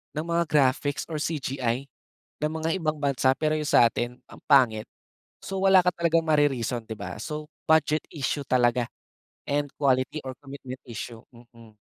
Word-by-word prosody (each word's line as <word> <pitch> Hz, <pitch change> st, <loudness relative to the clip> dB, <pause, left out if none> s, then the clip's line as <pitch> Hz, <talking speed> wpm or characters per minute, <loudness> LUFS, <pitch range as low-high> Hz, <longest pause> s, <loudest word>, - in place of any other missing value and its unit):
ng 155 Hz, -, -2 dB
mga 170 Hz, 0 st, +2 dB
graphics 145 Hz, 0 st, +2 dB
or 160 Hz, -, -5 dB
CGI 135 Hz, -4 st, -2 dB, 0.6 s
ng 155 Hz, -, +1 dB
mga 160 Hz, +1 st, -1 dB
ibang 155 Hz, -2 st, -1 dB
bansa, 135 Hz, -2 st, +2 dB
pero 155 Hz, 0 st, 0 dB
'yong 150 Hz, -1 st, -2 dB
sa'tin 120 Hz, +1 st, +3 dB
ang -, -, -14 dB
pangit. 120 Hz, -7 st, +4 dB, 0.6 s
So 195 Hz, 0 st, -4 dB
wala 190 Hz, -1 st, +6 dB
ka 180 Hz, -, +3 dB
talagang 165 Hz, -1 st, +2 dB
mari-reason, 130 Hz, -6 st, +1 dB
'di 110 Hz, -, -5 dB
ba? 100 Hz, -, -6 dB
So 150 Hz, -1 st, -5 dB, 0.2 s
budget 155 Hz, -1 st, +3 dB
issue 140 Hz, -1 st, -2 dB
talaga 120 Hz, -1 st, +2 dB, 0.6 s
and 145 Hz, 0 st, -1 dB
quality 135 Hz, +1 st, +1 dB
or 130 Hz, -, -4 dB
commitment 135 Hz, -2 st, -9 dB
issue, 115 Hz, 0 st, -7 dB
mm. 115 Hz, -2 st, -17 dB
140 Hz, 155 wpm, -26 LUFS, 125-155 Hz, 0.6 s, wala